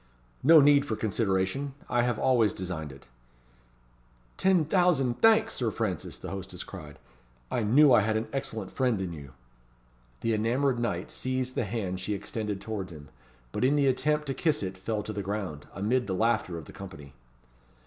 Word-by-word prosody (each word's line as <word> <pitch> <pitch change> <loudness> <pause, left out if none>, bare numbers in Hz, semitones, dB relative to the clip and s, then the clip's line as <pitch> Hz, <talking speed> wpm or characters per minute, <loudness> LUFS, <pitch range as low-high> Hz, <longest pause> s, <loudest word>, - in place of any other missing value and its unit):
"No 160 +3 +8
need 145 0 +6
for 115 -6 -3
consideration; 110 +5 -1
I 120 - +2
have 120 -2 0
always 115 -4 +3
designed 85 -5 -5
it." 70 - -14 1.3
"Ten 185 -4 +3
thousand 155 -8 +2
thanks, 225 0 +5
Sir 120 -3 -1
Francis!" 105 -6 -3
the - - -7
hostess 95 -1 -6
cried. 75 -6 -10 0.5
"I - - 0
knew 130 +6 +6
I 120 - +7
had 110 +1 +1
an 110 - -3
excellent 110 -7 -4
friend 125 -6 +1
in 90 -3 -3
you." 70 -4 -10 0.9
The 115 - +1
enamoured 120 +4 +1
knight 120 - -2
seized 130 0 -2
the 120 - -1
hand 95 -4 -3
she 100 +3 -2
extended 105 0 -4
towards 100 -3 -5
him, 75 -3 -11 0.4
but - - -2
in 135 +3 +4
the 145 -1 +3
attempt 150 +3 +1
to 135 - -2
kiss 150 -4 0
it 95 0 -4
fell 105 +3 -3
to 110 - -5
the 100 - -3
ground, 95 -6 -4
amid 120 +6 0
the 95 - -1
laughter 110 -5 +1
of 80 - -8
the - - -12
company. 75 -8 -10
110 Hz, 180 wpm, -28 LUFS, 95-130 Hz, 1.3 s, No